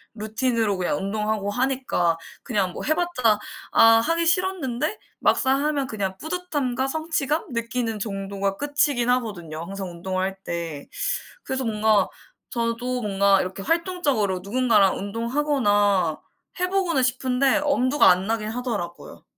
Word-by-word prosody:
루틴으로 220 -1 0
그냥 180 -5 -1
운동하고 210 +2 -2
하니까 245 -8 0 0.3
그냥 200 -7 0
뭐 - - -6
해봤자 305 -10 +1 0.3
아 - - +5 0.2
하기 330 +7 +1
싫었는데 330 - +1 0.2
막상 270 +2 +2
하면 290 -3 0
그냥 195 -5 -3
뿌듯함과 290 -7 -2
성취감 315 0 -1
느끼는 230 -1 -2
정도가 195 -1 -3
끝이긴 285 -4 +2
하거든요 195 -11 -2
항상 195 +1 -6
운동할 185 +2 -3
때. 165 -4 -5 0.6
그래서 265 0 -2
뭔가 215 -2 +2 0.4
저도 240 +2 -2
뭔가 200 -2 +3
이렇게 185 +1 -5
활동적으로 290 - 0
누군가랑 215 -2 +3
운동하거나 205 - +1 0.4
해보고는 360 -5 +1
싶은데 255 +2 +2
엄두가 280 -2 +4
안 185 +1 +3
나긴 220 -1 -1
하더라고요. 220 -7 -5
230 Hz, 315 characters per minute, -24 LUFS, 195-275 Hz, 0.6 s, 아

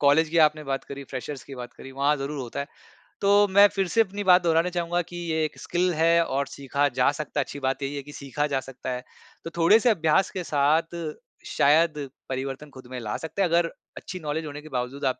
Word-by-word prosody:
College 145 +3 +4
की 165 +2 +1
आपने 155 0 +1
बात 135 -1 -3
करी, 140 0 -8
फ्रेशर्स 135 +1 -6
की 140 - -9
बात 125 -1 -8
करी, 135 - -11
वहाँ 140 +2 +2
ज़रूर 140 +1 -4
होता 125 0 -4
है। 140 - -3 0.6
तो 205 +1 +5
मैं 200 +1 +7
फिर 195 -2 +1
से 230 - +3
अपनी 205 -1 -2
बात 180 -1 +6
दोहराना 165 +1 +3
चाहूँगा 175 0 -1
कि 175 +1 -9
ये 160 0 +1
1 155 - -6
स्किल 180 +1 0
है 165 +1 +4
और 140 -1 -1
सीखा 140 +1 -1
जा 125 +2 +4
सकता 145 0 -4
है, - - +3
अच्छी 140 - -8
बात 135 0 -1
यही 140 +1 -3
है 140 - -3
कि 145 - -11
सीखा 140 +1 -2
जा 140 -2 0
सकता 130 -1 -8
है। 125 0 -4 0.4
तो 165 - -5
थोड़े-से 210 +8 +5
अभ्यास 185 -2 +3
के 185 - -4
साथ, 155 +3 +1 0.5
शायद 150 -1 +2 0.2
परिवर्तन 135 +2 -4
खुद 130 -2 -12
में 125 - -4
ला 105 -2 -4
सकते 160 +4 -4
हैं। 180 - +3
अगर 170 0 +2 0.3
अच्छी 185 - -7
नॉलेज 155 0 -3
होने 150 0 -7
के 155 - -12
बावजूद 130 +2 -3
आप, 130 -1 0
150 Hz, 235 wpm, -26 LUFS, 135-170 Hz, 0.6 s, मैं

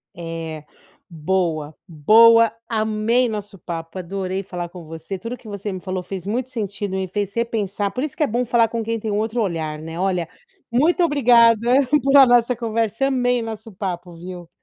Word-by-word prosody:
É. 165 -2 -6 0.5
Boa, 160 -2 -1
boa. 225 +8 +6 0.2
Amei 220 +2 +1
o - - -4
nosso 205 -2 -6
papo, 165 +2 -6
adorei 190 +1 -3
falar 175 -2 -6
com 175 -1 -11
você. 165 +4 -7
Tudo 230 +6 -5
que - - -25
você 205 0 -5
me 185 -1 -6
falou 185 -1 -3
fez 190 -1 -7
muito 245 +5 -2
sentido, 205 -4 -4
e 190 - -1
me 190 - -3
fez 200 0 -3
repensar 210 -4 -2
por 255 - -4
isso 305 - -4
que - - 0
é 290 - +2
bom 240 +3 -1
falar 230 -1 +3
com 230 0 -3
quem 230 +1 -2
tem 215 0 -3
um 205 - 0
outro 220 +2 -1
olhar, 160 -6 -2
né. 165 +2 -7
Olha, 180 -3 -1 0.4
muito 330 +8 +3
obrigada 235 -7 +5 0.4
por 275 +2 +2
a 275 - +9
nossa 245 0 +3
conversa, 230 +2 -1
amei 245 -2 +1
nosso 225 -1 -7
papo, 180 -2 -5
viu. 175 0 -9
205 Hz, 195 wpm, -21 LUFS, 180-230 Hz, 0.5 s, a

